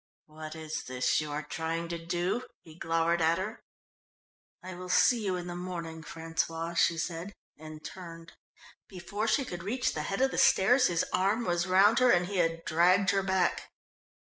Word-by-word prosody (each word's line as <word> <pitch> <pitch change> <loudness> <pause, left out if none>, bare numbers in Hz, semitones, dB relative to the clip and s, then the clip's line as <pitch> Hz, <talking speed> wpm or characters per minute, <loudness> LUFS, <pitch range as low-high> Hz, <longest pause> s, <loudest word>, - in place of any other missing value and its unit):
"What 155 0 -9
is 155 -1 -5
this 125 +3 0
you 155 - -5
are 150 +1 -3
trying 165 +2 -3
to 170 -1 -5
do?" 175 +8 -2 0.2
he 160 - -14
glowered 165 +1 0
at 165 +1 +3
her. 210 +4 -5 1.0
"I 185 +1 -7
will 180 +1 -8
see 235 +5 +4
you 190 -2 0
in 175 -1 -5
the 175 0 -6
morning, 170 -3 -6
François," 165 +1 -3
she 170 0 +3
said 170 +4 -4 0.2
and 155 0 -11
turned. 165 -2 -9 0.6
Before 200 +4 -4
she 275 - +2
could 175 -6 -6
reach 240 +7 -1
the 150 - -3
head 195 +5 -2
of 265 0 +3
the - - -1
stairs 250 +7 +5
his 170 -1 0
arm 205 +5 +1
was 175 -1 0
round 200 +5 +5
her 255 -1 +5
and 175 -5 +4
he 195 +1 -4
had 165 -1 0
dragged 180 +4 +3
her 195 - +1
back. 190 -1 0
175 Hz, 185 wpm, -29 LUFS, 165-190 Hz, 1.0 s, stairs